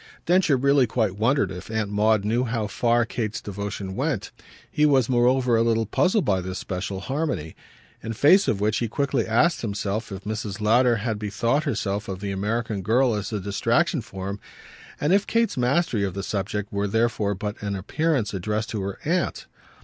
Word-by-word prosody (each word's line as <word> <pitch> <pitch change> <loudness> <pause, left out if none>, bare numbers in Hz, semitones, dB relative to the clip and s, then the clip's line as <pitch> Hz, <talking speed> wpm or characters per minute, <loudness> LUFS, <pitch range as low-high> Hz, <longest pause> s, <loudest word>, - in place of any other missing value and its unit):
Densher 175 -6 +3
really 140 0 +3
quite 110 -4 0
wondered 115 -1 +1
if 90 +2 -8
Aunt 110 -2 -2
Maud 105 0 +2
knew 115 +4 +1
how 115 -2 -1
far 120 +3 +1
Kate's 110 -2 -3
devotion 100 -1 -5
went. - - -2 0.4
He 150 - +1
was 135 -5 +4
moreover 125 0 +3
a 115 - +3
little 115 -1 +2
puzzled 185 - +2
by 95 -2 +1
this 95 +1 -5
special 95 +1 -4
harmony; 135 - -3 0.5
in 115 - -4
face 170 - +5
of 100 - +1
which 105 +2 +1
he 120 - -1
quickly 135 0 -1
asked 155 +10 +2
himself 105 0 -3
if 95 0 -7
Mrs. 105 -1 -4
Lowder 120 +3 +4
had 110 0 -2
bethought 115 +8 0
herself 105 -6 -2
of 95 -1 -5
the 100 0 -4
American 105 +2 -2
girl 120 +5 +2
as 105 0 -3
a 105 - -2
distraction 115 - +1
for 95 -3 -7
him, 100 +1 -5 0.6
and 150 +5 +2
if 200 +1 +3
Kate's 230 0 +1
mastery 125 -2 +1
of 95 -2 -2
the 100 - -3
subject 105 +1 -3
were 100 0 0
therefore 110 -1 0
but 105 +2 -5
an 100 -1 -2
appearance 125 - -1
addressed 105 +4 -2
to 105 - -2
her 95 0 -4
aunt. 170 +1 -1
110 Hz, 190 wpm, -24 LUFS, 100-125 Hz, 0.6 s, face